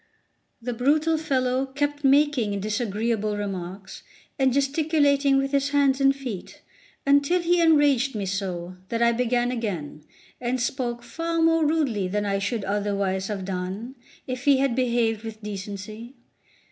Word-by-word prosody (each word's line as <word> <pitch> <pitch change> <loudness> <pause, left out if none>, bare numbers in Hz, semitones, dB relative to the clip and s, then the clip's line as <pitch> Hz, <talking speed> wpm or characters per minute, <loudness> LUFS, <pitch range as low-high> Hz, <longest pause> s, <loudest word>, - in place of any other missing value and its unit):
The 245 +1 -4
brutal 300 +7 +2
fellow 265 -4 0
kept 290 +2 -2
making 270 -7 +3
disagreeable 215 0 -1
remarks 190 -1 -6 0.4
and 265 -1 +4
gesticulating 280 0 +2
with 275 0 0
his 280 0 +1
hands 280 -1 +2
and 275 0 +4
feet, 245 -9 -7 0.4
until 285 +5 +4
he 350 0 +2
enraged 290 -6 +4
me 205 -2 -2
so 185 -2 -4
that 230 0 0
I 235 - +5
began 245 +1 +1
again, 175 -11 -4 0.4
and 250 +1 -1
spoke 240 -1 -2
far 330 +7 -3
more 325 -1 +4
rudely 270 - 0
than 205 +2 -1
I 195 -1 0
should 205 +2 -2
otherwise 200 -1 -1
have 195 -3 -4
done, 190 +6 -4 0.3
if 255 0 -5
he 280 -2 +6
had 265 -3 +1
behaved 235 -3 +1
with 220 -1 -8
decency. 210 +4 -7
240 Hz, 145 wpm, -25 LUFS, 205-280 Hz, 0.4 s, he